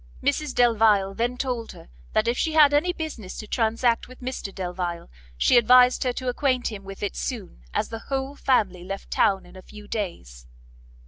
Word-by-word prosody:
Mrs 285 -1 0
Delvile 220 -5 +4
then 240 +4 -1
told 245 -3 -3
her - - -14 0.3
that 215 - +2
if 235 - +2
she 320 +5 -1
had 300 -2 +6
any 310 +5 +3
business 310 - -6
to - - -6
transact 230 +1 +1
with 255 0 -14
Mr 250 -5 -5
Delvile, 175 - -4 0.3
she 240 - +4
advised 250 +2 +6
her 250 - +1
to 255 +1 -5
acquaint 250 -1 0
him 200 -2 -8
with 195 +1 -9
it 205 - -2
soon, 205 - -5
as - - -1
the 225 - -6
whole 270 +1 -2
family 200 -11 +1
left 195 +2 -7
town 195 -1 +2
in - - -16
a 185 - -10
few 210 +2 -13
days. 65 - -5
230 Hz, 190 wpm, -25 LUFS, 195-255 Hz, 0.3 s, had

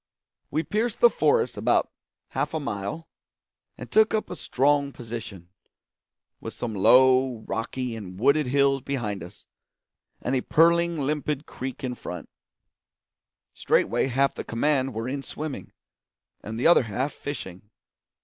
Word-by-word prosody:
We 155 - -1
pierced 220 +4 -1
the 480 - +7
forest 475 -2 +2
about - - +2 0.4
half - - -2
a - - 0
mile, 130 +5 -4 0.7
and - - -9
took 220 0 +4
up 215 - -2
a - - -4
strong 140 -1 +1
position, 110 -8 -8 0.9
with - - -8
some 115 -2 -4
low, 130 +3 +5
rocky, 120 +1 -3
and 95 -4 -8
wooded 140 +4 +3
hills 135 +1 +2
behind 115 -8 -3
us, 90 +4 -13 0.7
and 125 - -1
a 130 - +1
purling, 170 +3 +3
limpid 150 0 -2
creek 130 +1 -7
in 125 -1 -2
front. 90 -8 -8 1.2
Straightway - - +1
half 135 +2 +1
the - - -6
command 135 +1 0
were 115 +2 -3
in 140 +2 -3
swimming, 150 0 -6 0.7
and 110 +2 -5
the - - -1
other 170 - +7
half 130 +7 -2
fishing. 105 -9 -7
135 Hz, 140 wpm, -25 LUFS, 115-150 Hz, 1.2 s, the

